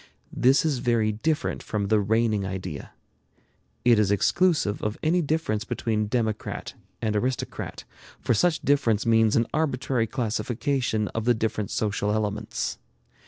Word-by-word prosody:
This 135 +5 +4
is 145 -5 +1
very 115 -3 +2
different 150 +9 -1
from 100 -2 -3
the 110 - +4
reigning 110 0 +1
idea. 95 -6 -5 0.9
It 120 -3 +6
is 105 -3 +3
exclusive 125 - +2
of 105 0 -2
any 170 +3 +3
difference 150 -9 -1
between 110 0 -1
democrat 110 -2 -2 0.3
and 110 -1 0
aristocrat, 125 +4 -3 0.4
for - - +1
such 165 +8 +2
difference 125 -7 +2
means 115 -1 +4
an 115 - +3
arbitrary 135 -6 0
classification 120 -1 -1
of 115 -1 -4
the 120 0 +4
different 110 -2 -2
social 105 -1 -1
elements. 105 0 -2
115 Hz, 135 wpm, -25 LUFS, 105-130 Hz, 0.9 s, It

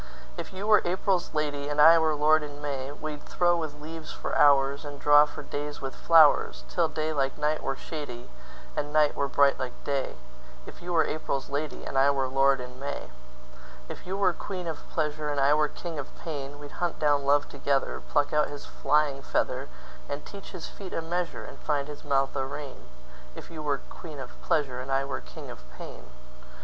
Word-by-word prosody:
If - - -6
you 190 +2 -5
were 215 0 +6
April's 185 +1 0
lady, 145 -1 -1
And 145 0 -2
I 165 +2 +9
were 160 -1 +2
lord 155 +1 +4
in 145 -1 -7
May, 140 -2 -3
We'd 150 0 -6
throw 175 -1 +2
with 155 -3 -4
leaves 160 +1 -7
for - - -5
hoursAnd 140 +1 +3
draw 145 +1 +6
for - - -8
days 145 0 -5
with 135 -1 -5
flowers, 150 - +5
Till - - +2
day 155 0 -2
like 135 -2 0
night 150 +1 0
were 135 - -1
shadyAnd 135 -6 -7 0.6
night 150 0 +3
were 140 - 0
bright 140 0 +4
like 130 -2 -5
day; 140 -2 -1 0.5
If - - -12
you 175 +1 -5
were 165 -2 +4
April's 140 -3 -3
lady, 145 +1 -3
And 135 - 0
I 135 +1 +6
were 135 -2 +1
lord 135 +1 +3
in 125 0 -8
May.If - - -10
you 190 +1 -2
were 195 -3 +3
queen 185 0 -5
of 160 -2 -6
pleasure, 150 -1 -1
And 145 -1 -1
I 140 +2 +5
were 150 0 +3
king 165 0 -6
of 135 - -8
pain, 145 -3 -6
We'd 145 +3 -10
hunt 175 -2 0
down 145 -2 +3
love 145 +1 +3
together, 140 -1 -1
Pluck 145 -1 +2
out 150 0 +3
his 145 -1 -8
flying 145 -1 +1
feather, - - -1 0.4
And 145 +1 -4
teach 200 -1 -10
his 185 -4 -7
feet 195 -2 -9
a - - -1
measure, 175 +1 -2
And - - -10
find 145 -2 -1
his 150 -1 -9
mouth 135 -2 +1
a 135 - 0
rein; 140 0 -7 0.5
If - - -10
you 160 -2 -6
were 145 -2 0
queen 155 -4 -9
of 130 -2 -7
pleasure. 135 -5 0
And 130 +1 -6
I 135 0 +2
were 140 - -4
king - - -10
of - - -10 0.2
pain. 60 - -9
145 Hz, 200 wpm, -28 LUFS, 135-155 Hz, 0.6 s, I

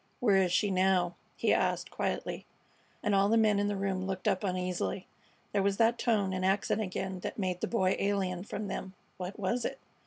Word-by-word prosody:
"Where 205 -5 +4
is 185 -2 +3
she 205 +2 +2
now?" 185 -2 +2 0.2
he - - +2
asked, - - 0
quietly; - - -3 0.6
and 210 - +1
all 195 +1 +4
the 225 - +4
men 215 -2 +4
in 205 - +1
the 205 - -1
room 190 -1 -1
looked 190 -1 -3
up 190 - +1
uneasily. 180 -1 -2 0.5
There 200 - +2
was 195 0 +1
that 230 +1 +3
tone 205 -5 +1
and 185 0 -2
accent 195 +3 +1
again 190 -1 -3
that - - -5
made 185 -3 -2
the - - 0
Boy 190 -5 +2
alien 190 -3 0
from 205 0 -5
them. 190 0 -5 0.2
What 180 +2 -5
was 220 +5 0
it? 270 - -2
195 Hz, 205 wpm, -31 LUFS, 185-205 Hz, 0.6 s, Where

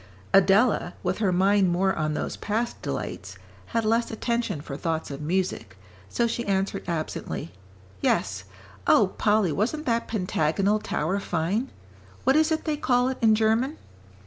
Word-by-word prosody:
Adela, 195 0 +4
with 185 +1 -1
her 200 -4 +2
mind 190 +1 +3
more 190 +2 +2
on 155 -1 -1
those - - -3
past 225 +3 -2
delights, - - -5 0.3
had 230 -1 -1
less 230 +2 +2
attention 235 -6 -2
for 140 -1 -7
thoughts 160 0 -3
of 140 +1 -6
music, 165 - -2 0.3
so 235 - +1
she 235 +1 -2
answered 195 0 0
absently, 160 -2 -4 0.5
"Yes. 95 0 0 0.4
Oh, 195 -3 +4
Polly, 210 -4 +3
wasn't 250 - -1
that 230 -1 0
Pentagonal 195 0 +1
Tower 190 -1 -1
fine? 195 +8 -1 0.5
What 265 +2 +4
is 315 +1 +3
it 315 - 0
they 305 -2 0
call 250 -3 +2
it 265 - -4
in 220 -2 +5
German?" 225 +7 +1
200 Hz, 150 wpm, -26 LUFS, 175-230 Hz, 0.5 s, in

